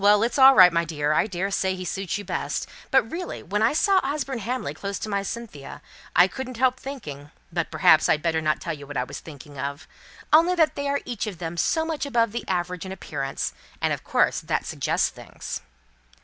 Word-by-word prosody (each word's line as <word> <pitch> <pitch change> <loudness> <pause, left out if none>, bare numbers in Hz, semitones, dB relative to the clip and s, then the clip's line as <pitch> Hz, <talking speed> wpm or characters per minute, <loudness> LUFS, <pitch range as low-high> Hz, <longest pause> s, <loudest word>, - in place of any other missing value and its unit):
It's 210 +6 +4
all 265 0 +9
right, 180 -3 +8
my 170 0 +2
dear. 150 -2 -1
I 155 - +2
daresay 190 0 -1
he 185 0 -6
suits 190 +1 -2
you 205 - -7
best. 180 - -2 0.2
But 265 - +5
really, 350 +1 -5
when 205 +4 -1
I 225 - +4
saw 385 +5 +4
Osborne 275 -2 -2
Hamley 230 - -3
close 200 +5 -4
to 215 - -5
my 200 -1 0
Cynthia, 200 -9 -7 0.4
I 180 +2 +7
couldn't 255 +3 -6
help 255 +1 +2
thinking 150 - -8 0.2
but - - -1
perhaps - - +5
I'd 150 - +2
better 160 -1 +1
not 155 -1 +1
tell - - -3
you 145 -2 -10
what 145 - -5
I 125 - +1
was - - -7
thinking 145 -2 -11
of. 140 +2 -4 0.5
Only 335 +4 +6
they 305 -4 +1
are 280 0 0
each 235 -3 -3
of 200 -5 -5
them 165 0 -5
so 320 - +1
much 315 -3 -3
above 230 -5 +2
the 235 - -4
average 180 -1 -2
in 190 - -7
appearance; 140 -7 -4 0.3
and, - - +1
of - - -5
course, - - +2
that - - -1
suggests - - 0
things." - - -8
200 Hz, 210 wpm, -25 LUFS, 160-260 Hz, 0.5 s, all